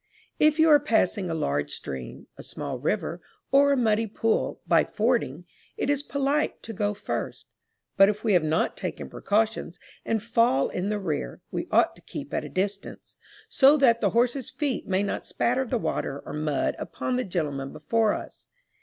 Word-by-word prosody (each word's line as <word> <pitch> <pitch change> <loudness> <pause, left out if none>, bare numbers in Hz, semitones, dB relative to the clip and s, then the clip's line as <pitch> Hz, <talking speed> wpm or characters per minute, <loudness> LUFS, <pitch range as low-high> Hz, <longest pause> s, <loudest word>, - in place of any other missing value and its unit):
If 305 0 +4
you 320 0 +5
are 295 -1 +8
passing 205 -6 +1
a 165 - -1
large 70 - -1
stream, 65 -2 -7
a - - -10
small 140 -4 -6
river, 170 +3 -2 0.3
or 280 +1 +5
a 280 - +3
muddy 225 -2 +2
pool, 225 +2 -1
by - - +5
fording, 215 - -1 0.3
it 285 - 0
is 285 -1 +1
polite 280 +1 -1
to 225 - -7
go 205 0 -1
first; - - -4 0.5
but 195 +1 +7
if 210 0 -3
we 220 -3 +2
have 175 -3 +4
not 155 +1 0
taken - - -5
precautions, 215 -3 -1 0.3
and 220 -2 -1
fall 230 - +2
in 185 +2 -2
the 210 - 0
rear, 155 - -3
we - - -3
ought - - +3
to - - -17
keep - - -8
at - - -1
a - - -7
distance, 195 +2 -4 0.3
so 280 +2 +5
that 235 -5 +4
the - - +3
horse's 245 +2 +1
feet 280 -2 -3
may 190 +1 +1
not 200 - -3
spatter 255 +2 0
the 245 - 0
water 140 -9 -3
or - - -7
mud 150 -2 -1
upon 255 - -3
the 255 - 0
gentleman 145 - -3
before 215 +8 +1
us. - - -10
210 Hz, 185 wpm, -26 LUFS, 165-250 Hz, 0.5 s, are